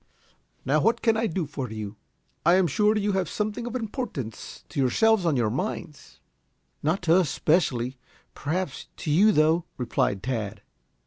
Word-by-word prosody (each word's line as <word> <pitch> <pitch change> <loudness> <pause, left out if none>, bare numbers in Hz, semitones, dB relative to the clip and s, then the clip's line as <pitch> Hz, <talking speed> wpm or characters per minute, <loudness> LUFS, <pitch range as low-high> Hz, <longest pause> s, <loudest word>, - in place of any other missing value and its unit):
"Now, 145 +3 +3
what 235 +5 +2
can 225 -2 +4
I 225 +1 +1
do 175 -2 -2
for 135 -3 -5
you? 105 -1 -6 0.5
I 170 +2 +5
am 190 -1 +4
sure 210 +5 +2
you 205 0 +1
have 190 -2 0
something 215 +3 -3
of 240 - -5
importance 210 - -5
to - - -4
yourselves 190 - +3
on 150 -5 +2
your 110 -3 +1
minds." 150 - -5 0.6
"Not 165 +5 0
to 165 0 +4
us 180 -6 +2
specially. 130 -7 +1 0.3
Perhaps 160 0 -3
to 155 - -3
you, 200 +8 +6
though," 160 0 +3
replied 105 -5 0
Tad. 110 -5 -3
160 Hz, 165 wpm, -26 LUFS, 130-210 Hz, 0.6 s, you